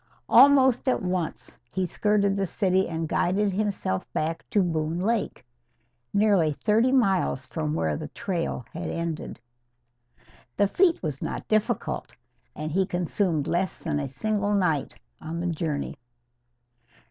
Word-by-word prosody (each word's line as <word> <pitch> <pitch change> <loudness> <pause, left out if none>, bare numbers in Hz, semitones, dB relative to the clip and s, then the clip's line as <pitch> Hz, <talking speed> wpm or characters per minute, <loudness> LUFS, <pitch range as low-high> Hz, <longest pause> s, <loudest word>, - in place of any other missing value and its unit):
Almost 265 0 +6
at 255 - 0
once 180 -3 -3
he 190 -1 -1
skirted 200 +2 +1
the 195 -1 0
city 190 0 +1
and 165 -1 -2
guided 195 +5 +1
himself 195 - -2
back 160 +2 -2
to 205 - +3
Boone 160 -1 -1
Lake, 215 - -1 0.7
nearly 200 -7 +3
thirty 225 - +2
miles 195 - +2
from 75 0 -3
where 80 -2 0
the - - -5
trail 170 - -3
had 170 +1 -4
ended. 165 -6 -4 1.2
The 205 - +4
feat 345 - +2
was 150 -4 -3
not - - -4
difficult, 215 0 -1 0.4
and 155 +1 -4
he 190 +3 +1
consumed 175 -3 0
less 175 +3 -1
than 145 - -2
a 140 - -2
single 205 +9 -1
night 165 -8 0 0.3
on 165 +2 -5
the 170 - -3
journey. 155 -3 -3
180 Hz, 135 wpm, -26 LUFS, 160-205 Hz, 1.2 s, Almost